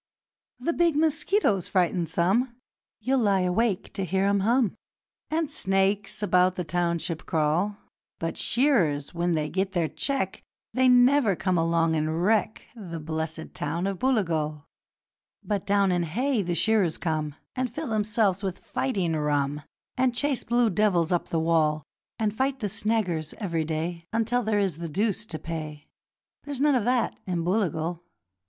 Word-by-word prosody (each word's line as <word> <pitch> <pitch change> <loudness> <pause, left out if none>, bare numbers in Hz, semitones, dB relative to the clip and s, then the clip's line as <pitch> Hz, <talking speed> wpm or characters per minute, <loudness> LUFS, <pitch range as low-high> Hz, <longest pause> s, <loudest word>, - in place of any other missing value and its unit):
'The 270 +7 -1
big 340 -3 +2
mosquitoes 305 - +2
frighten 175 -2 +1
some 200 +10 +1 0.5
You'll 260 +4 +1
lie 200 -4 +3
awake 185 +2 0
to 195 - -3
hear 190 +2 0
'em 200 0 +2
hum 230 +1 +2 0.6
And 315 -1 -1
snakes 195 -4 0
about 185 -2 +3
the 180 - -2
township 170 0 -2
crawl; 165 +6 +1 0.4
But 165 0 -3
shearers, 185 - +1
when 175 0 0
they 155 -1 -1
get 190 +4 -2
their 170 -3 +1
cheque, 275 - -2 0.3
They 255 0 +4
never 250 -3 +5
come 185 0 0
along 165 -1 +2
and 155 +2 -1
wreck 215 +1 +1
The 175 -7 -7
blessed 160 +1 -4
town 165 +5 -2
of 195 -2 -2
Booligal. 160 - 0 0.8
'But 205 -3 -2
down 200 -1 +3
in 175 -1 +1
Hay 230 - 0
the 175 -2 -2
shearers 185 -2 +2
come 155 -3 -2 0.2
And 255 -2 -1
fill 305 +3 -5
themselves 210 -3 +1
with 190 -3 -3
fighting 190 -11 -1
rum, 145 -1 0 0.4
And 250 -1 +2
chase 275 +1 0
blue 240 -1 +2
devils 180 -4 +2
up 175 - 0
the 165 - -1
wall, 155 -2 +2 0.3
And 215 -2 0
fight 265 +4 0
the 210 -4 -2
snaggers 185 -7 0
every 170 -7 -2
day, 165 +2 -3
Until 230 +2 +1
there 215 -2 0
is 190 -6 0
the 170 -1 -4
deuce 210 +5 -1
to 160 - -5
pay 155 -2 -7 0.5
There's 285 -3 -5
none 290 +1 +4
of 245 -5 +1
that 245 -1 +1
in 175 -2 -1
Booligal. 175 -3 -1
190 Hz, 160 wpm, -26 LUFS, 165-230 Hz, 0.8 s, never